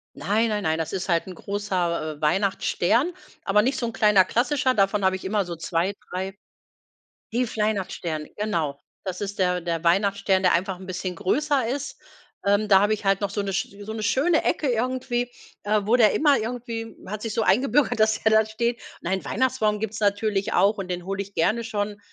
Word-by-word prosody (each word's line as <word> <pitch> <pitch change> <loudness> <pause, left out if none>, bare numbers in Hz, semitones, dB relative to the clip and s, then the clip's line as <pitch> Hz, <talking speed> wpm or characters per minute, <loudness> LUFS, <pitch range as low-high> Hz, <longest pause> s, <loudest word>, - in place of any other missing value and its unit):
Nein, 220 +4 +1
nein, 210 -1 -1
nein, 160 -2 0
das 160 +2 -3
ist 190 0 -3
halt 170 -1 +2
'n 185 - -8
großer, 175 -6 -2
äh, - - -22
Weihnachtsstern, 195 - +1 0.3
aber 210 +1 +3
nicht 260 +2 0
so 235 - -1
'n 230 - -5
kleiner 210 -3 +5
klassischer 255 +5 +1
davon 195 0 +2
habe 190 0 +3
ich 190 - -8
immer 205 0 +1
so 175 -1 -6
2, 165 +4 -1 0.2
3, 190 +2 -4 0.9
ne, 245 +1 0
fl 220 - -4
Weihnachtsstern, 180 -7 -2
genau. 165 -10 -1 0.2
Das 185 -1 -4
ist 205 0 -5
der 180 -1 +1
der 170 -1 -3
Weihnachtsstern, 195 +1 +2
der 180 - +4
einfach 185 +2 0
'n 190 - -10
bisschen 185 -1 -4
größer 275 - +1
ist. 285 +2 -4 0.5
Ähm, 205 +1 +2
da 195 -2 +7
habe 210 +1 +3
ich 210 - -4
halt 195 0 +2
noch 200 -1 -1
so 205 - -1
'ne 200 -1 -3
sch 195 +1 -2
so 220 +2 -6
'ne 220 -1 -4
schöne 285 +9 +2
Ecke 295 - 0
irgendwie, 245 0 -1 0.3
äh, 210 0 +2
wo 230 +3 +4
der 220 -4 +5
immer 290 -3 +4
irgendwie 230 0 -5
hat 215 +2 -5
sich 225 - -3
so 225 - 0
eingebürgert, 265 +3 +2
dass 220 0 +3
der 220 - +3
da 220 0 +5
steht. 235 +2 -2 0.2
Nein, 190 +2 -2
Weihnachtsbaum 220 -3 +1
gibt's 220 0 -4
natürlich 205 -1 0
auch 205 +2 +3
und 190 -2 -5
den 175 0 -3
hole 195 +1 -3
ich 200 - -16
gerne 215 +8 +1
schon 205 -1 -3
205 Hz, 205 wpm, -24 LUFS, 190-225 Hz, 0.9 s, da